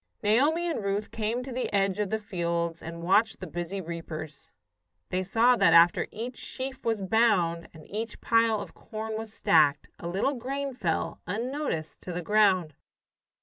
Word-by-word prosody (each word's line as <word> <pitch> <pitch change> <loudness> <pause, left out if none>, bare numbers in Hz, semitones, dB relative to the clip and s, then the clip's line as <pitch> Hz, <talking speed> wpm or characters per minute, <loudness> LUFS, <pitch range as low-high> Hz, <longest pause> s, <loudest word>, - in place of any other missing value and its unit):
Naomi 290 +11 +3
and 315 -11 -2
Ruth 200 +1 -2
came 225 +3 -2
to 265 - -7
the 250 +1 -2
edge 195 -1 +1
of 205 -2 0
the 220 - 0
fields 170 -5 -2
and 170 0 -7
watched 205 +6 +3
the 185 - -6
busy 175 +3 -4
reapers. 160 -3 -7 0.6
They 185 - 0
saw 225 +6 +4
that - - +5
after 170 +1 +6
each 240 +3 -6
sheaf 260 0 -5
was 225 -3 0
bound, 185 -6 +2
and 155 -2 -14
each 220 +2 -5
pile 230 -2 +3
of - - -8
corn 220 0 -6
was 220 0 -5
stacked, 155 -8 +3
a 170 - -5
little 195 +11 0
grain 275 +2 -3
fell, 175 -10 -2
unnoticed, 230 - -3
to 180 - -6
the 175 0 -4
ground. 190 -5 +3
205 Hz, 170 wpm, -28 LUFS, 170-230 Hz, 0.6 s, after